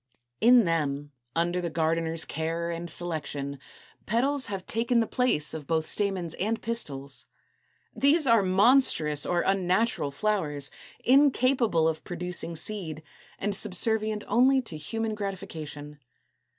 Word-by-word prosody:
In 240 +1 +6
them, 145 -3 -1 0.2
under 175 +2 0
the 170 - -2
gardener's 160 0 -1
care 165 +1 -3
and 170 +1 -5
selection, 145 -5 -3 0.5
petals 265 +5 +1
have 195 -2 -5
taken 235 +2 +1
the 230 - +2
place 235 -12 +1
of 150 -3 -7
both 160 -1 0
stamens 190 -5 -1
and 220 +4 0
pistils. 140 - -2 0.7
These 295 +3 +4
are 230 -4 +5
monstrous 185 - +3
or 175 -1 +1
unnatural 190 -2 +1
flowers, 150 -4 -1 0.3
incapable 255 - +3
of 160 -1 -2
producing 175 -1 -4
seed, 160 -4 -4 0.3
and 205 +1 -2
subservient 215 +2 0
only 255 +5 +4
to 175 - -6
human 220 +9 -3
gratification. 160 -8 -6
180 Hz, 125 wpm, -27 LUFS, 160-225 Hz, 0.7 s, In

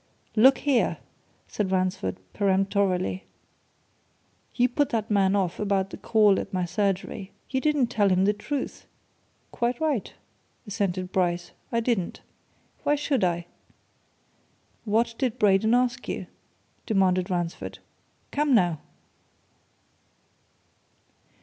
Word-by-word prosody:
"Look 260 +5 +7
here!" 275 -5 +1 0.5
said 200 -3 -2
Ransford 185 - 0 0.2
peremptorily. 195 -1 +1 1.3
"You 245 0 +4
put 280 +3 0
that 220 -2 -2
man 195 -1 +3
off 185 -3 0
about 195 -2 0
the - - -7
call 210 -3 +4
at - - -6
my 185 -1 0
surgery. 195 +2 -2 0.2
You 265 -1 0
didn't 300 -3 +2
tell 205 -2 +3
him 185 +1 +3
the 205 - +3
truth." 260 +7 -5 0.6
"Quite 240 +1 -1
right," 300 -9 -1 0.5
assented 190 -3 -2
Bryce. 175 -1 0 0.2
"I 230 - +1
didn't. 225 -7 -1 0.6
Why 295 - +2
should 285 -5 0
I?" 175 -1 0 1.4
"What 230 +2 +1
did 255 -5 0
Braden 210 +3 +4
ask 245 -1 0
you?" - - -3 0.6
demanded 185 -4 +2
Ransford. 175 -2 -3 0.5
"Come, 290 -2 +2
now?" 175 -7 +2
200 Hz, 110 wpm, -26 LUFS, 185-240 Hz, 1.4 s, Look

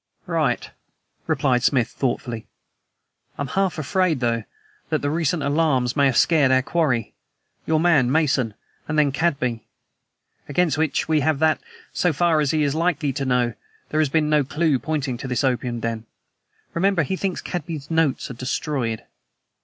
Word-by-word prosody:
"Right," - - -1 0.6
replied 125 -3 +2
Smith 125 -2 +2
thoughtfully. 120 -3 -3 0.9
"I - - -2
am 140 - -5
half 190 +3 0
afraid, 165 0 +1
though, 115 -2 0 0.4
that - - -1
the 145 - 0
recent 165 0 0
alarms 140 -4 +1
may 140 -2 +4
have 130 - +1
scared 155 -5 +4
our 130 0 +4
quarry 130 -9 0 0.5
your 160 -1 +2
man, 150 -7 +3
Mason, 135 -8 +1 0.3
and 155 - -2
then 145 -2 +4
Cadby. 135 -6 -1 0.8
Against 160 0 +2
which 160 -2 0
we 155 -1 +3
have 150 +1 +1
that, 155 +1 +2 0.3
so 180 - +2
far 165 +1 +2
as 150 -2 +1
he 155 +1 +2
is 140 -1 +1
likely 160 -3 0
to 135 +1 -2
know, 125 -2 +1 0.4
there 155 - +1
has 155 - +1
been 155 +1 +2
no 150 -1 +3
clew 150 0 +1
pointing 140 -5 -2
to - - -5
this 125 0 -1
opium 125 -2 0
den. 115 -1 -3 0.7
Remember, 185 -1 +2
he 190 - -2
thinks 190 -1 -2
Cadby's 165 -5 -5
notes 160 -5 +1
are - - -5
destroyed." 125 -2 -2
145 Hz, 165 wpm, -23 LUFS, 130-160 Hz, 0.9 s, may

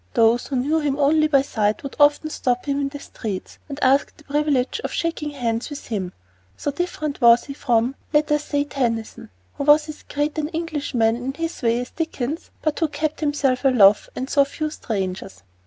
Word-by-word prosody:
Those 230 +1 +3
who 275 - -3
knew 290 +6 +1
him 285 -3 -1
only 305 +2 +4
by 275 -3 +4
sight 215 -5 -1
would 275 - -6
often 295 +2 +4
stop 250 -4 -1
him 285 0 0
in 275 - -1
the 285 - -7
streets 215 -8 -7
and 280 - -5
ask 270 +2 +3
the 305 - -18
privilege 290 -3 0
of - - -3
shaking 330 -3 -2
hands 240 -4 -2
with 290 -1 -8
him; 190 -5 -2 0.5
so 290 - -2
different 305 -2 -3
was 235 0 +7
he 280 - -7
from 245 -2 +1 0.2
let 300 -1 +2
us 295 0 +1
say 285 -1 0
Tennyson, 235 - -3 0.3
who - - -2
was 295 +1 +5
as 305 - -8
great 295 +2 -2
an 300 - -1
Englishman 295 -9 0
in 255 +2 -4
his 330 0 -4
way 235 -1 +2
as 245 - -6
Dickens, 320 -1 -4
but 310 -1 0
who 325 - +2
kept 300 +1 -3
himself 290 -4 0
aloof 215 -7 +5
and 260 - -3
saw 280 0 +4
few 305 +2 -4
strangers. 185 - -4
280 Hz, 200 wpm, -22 LUFS, 240-300 Hz, 0.5 s, was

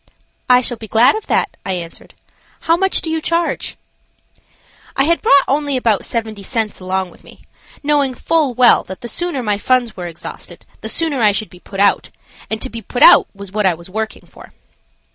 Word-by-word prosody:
"I 250 0 +6
shall 240 -1 -3
be 220 - -10
glad 235 +5 +4
of 435 - -6
that," 415 - 0
I 190 - -2
answered. 170 -2 -8 0.5
"How 330 - +3
much 385 +2 +1
do 325 - -4
you 320 0 -1
charge?" 335 +1 -1 1.2
I 270 - +3
had 335 +4 +1
brought 280 0 +5
only 285 0 0
about 225 -5 +1
seventy 220 -3 -4
cents 220 0 -2
along 185 0 -2
with - - -20
me, - - -16 0.4
knowing 285 -3 +1
full 300 -3 +1
well 245 0 +5
that 190 0 -9
the 240 - -6
sooner 310 +1 -3
my 210 -2 -1
funds 245 -1 +1
were 180 -2 -6
exhausted 170 -1 -10 0.2
the - - -4
sooner 310 -6 0
I 210 -2 +5
should 215 +1 -4
be 180 - -15
put 195 +1 -9
out, 200 0 +2 0.4
and 220 - -3
to 260 - -3
be 230 - -6
put 245 +4 0
out - - +8
was 200 -1 -10
what 210 -1 +1
I 180 - +2
was 170 +3 -13
working 220 +2 -4
for. - - -16
235 Hz, 200 wpm, -17 LUFS, 200-280 Hz, 1.2 s, out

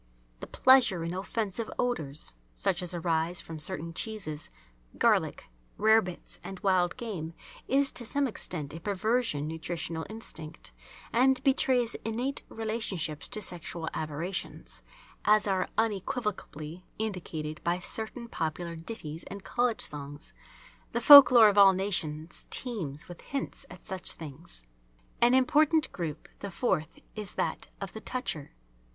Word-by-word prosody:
The - - -7
pleasure 245 -10 +5
in 170 +1 -3
offensive 205 +2 -3
odours, 155 - -2 0.2
such - - 0
as 180 - -2
arise 165 0 0
from 160 -1 -8
certain 165 +2 -3
cheeses, 165 -7 -4 0.5
garlic, - - +2 0.3
rarebits, 215 -4 +2
and 190 -1 -7
wild 185 -2 +2
game 180 -10 -5 0.3
is 275 +1 +3
to 245 - -1
some 280 +5 +1
extent 160 - -2
a 165 - -6
perversion 205 - 0
nutritional 160 0 -4
instinct 165 -8 -7 0.4
and 260 +2 +4
betrays 255 -3 +3
innate 245 +5 -1
relationships 210 -9 -2
to 215 -4 -3
sexual 170 -2 -4
aberrations, 160 +5 -4 0.4
as 210 0 +5
are 190 -2 +1
unequivocally 195 - -2
indicated 165 -8 -4
by 170 +1 +1
certain 220 +5 -5
popular 170 -2 -3
ditties 165 -3 -6
and 200 0 -8
college 240 +1 0
songs. 145 0 -5 0.6
The 235 - +1
folk 285 +2 +12
lore 235 -3 +8
of 205 0 +3
all 195 -1 +9
nations 170 -5 -2
teems 175 - -2
with 175 -1 -10
hints 275 -1 -4
at 180 0 -13
such 190 -1 -2
things. 150 - -7 0.6
An 245 +2 +6
important 305 +4 +4
group, 160 -4 -5
the 200 - -5
fourth, 175 -6 -1
is 210 -3 -4
that - - -2
of 195 -1 -6
the 220 - -7
"toucher." 220 - -4
190 Hz, 135 wpm, -29 LUFS, 160-225 Hz, 0.6 s, folk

